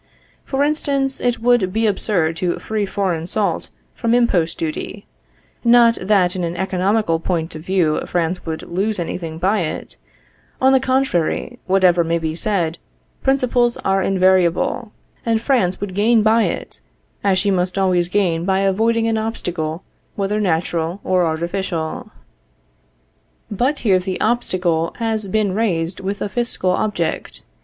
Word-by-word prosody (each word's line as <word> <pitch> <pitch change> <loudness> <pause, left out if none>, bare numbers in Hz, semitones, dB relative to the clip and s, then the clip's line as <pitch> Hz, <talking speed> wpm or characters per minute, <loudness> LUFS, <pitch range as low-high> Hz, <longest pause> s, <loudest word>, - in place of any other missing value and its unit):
For 275 +1 0
instance, 280 -3 0
it 245 -1 0
would 240 -6 +3
be 225 +3 0
absurd 190 -6 +1
to 175 -1 -1
free 215 -2 -2
foreign 180 -5 -2
salt 205 +2 -1 0.2
from 235 0 +1
impost 180 -9 +2
duty; 165 +5 -5 0.6
not 235 -1 +6
that 185 -2 +2
in 180 - -2
an 170 +1 -3
economical 190 -1 +1
point 165 0 -2
of 155 - -8
view 175 -3 +1
France 175 +1 -1
would 160 -1 -5
lose 200 +5 -1
any 175 0 -3
thing 160 -2 -6
by 195 +5 +1
it; 160 -4 -4 0.6
on 265 +1 +4
the 265 - +5
contrary, 260 -10 0
whatever 185 -2 +4
may 165 +1 0
be 160 -1 -2
said, 170 -2 -1 0.4
principles 250 -3 +2
are 195 0 +2
invariable, 185 +3 +2 0.3
and 225 -1 +1
France 230 -7 +1
would 200 -2 -4
gain 215 +3 +3
by 220 +1 +4
it, - - -4 0.4
as 195 -2 +3
she 200 +1 +1
must 180 0 0
always 180 -3 +2
gain 180 -4 +1
by 190 +1 +1
avoiding 225 +4 +2
an 225 -1 +1
obstacle 175 -7 -3 0.3
whether 205 +1 -1
natural 165 -1 -1
or 180 -2 +2
artificial. 170 0 -3 1.4
But 255 +8 0
here 190 -3 +4
the 185 0 -4
obstacle 180 -8 0
has 220 -3 -1
been 205 0 0
raised 180 -5 -1
with 195 +1 -3
a - - -1
fiscal 235 -5 0
object. 180 -4 -2
190 Hz, 150 wpm, -19 LUFS, 175-220 Hz, 1.4 s, not